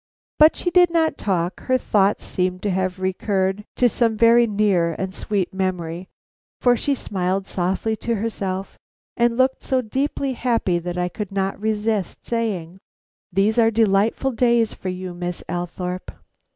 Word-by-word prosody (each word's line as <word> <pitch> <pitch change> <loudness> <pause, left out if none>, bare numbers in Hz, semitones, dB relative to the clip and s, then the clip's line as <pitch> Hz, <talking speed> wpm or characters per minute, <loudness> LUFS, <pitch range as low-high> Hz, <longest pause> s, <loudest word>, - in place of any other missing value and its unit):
But 310 +1 +7
she 355 - -2
did 355 0 +6
not 330 -1 +1
talk. 180 -2 -1
Her 255 0 +1
thoughts 205 -4 +1
seemed 185 0 -2
to 205 - 0
have 185 0 -1
recurred 190 +1 -1
to 250 - +4
some 230 -1 +1
very 235 +1 +5
near 200 -6 +1
and 190 0 -3
sweet 195 -1 -2
memory, 180 -2 -3 0.5
for 245 -1 +4
she 280 +4 0
smiled 190 -4 -2
softly 190 +5 -1
to 235 +1 -1
herself 195 -3 -4 0.4
and 235 0 +2
looked 260 +1 +2
so 260 -1 0
deeply 270 +3 -1
happy 230 -8 0
that 175 +1 -5
I 180 0 0
could 200 +3 -6
not 195 0 -2
resist 215 -2 -1
saying: 195 -7 -2 0.5
"These 200 +5 +2
are 225 -1 +5
delightful 220 +4 +2
days 235 -2 +2
for 185 - -6
you, 185 0 -5
Miss 175 0 -5
Althorpe." 180 +1 -4
200 Hz, 155 wpm, -22 LUFS, 185-230 Hz, 0.5 s, But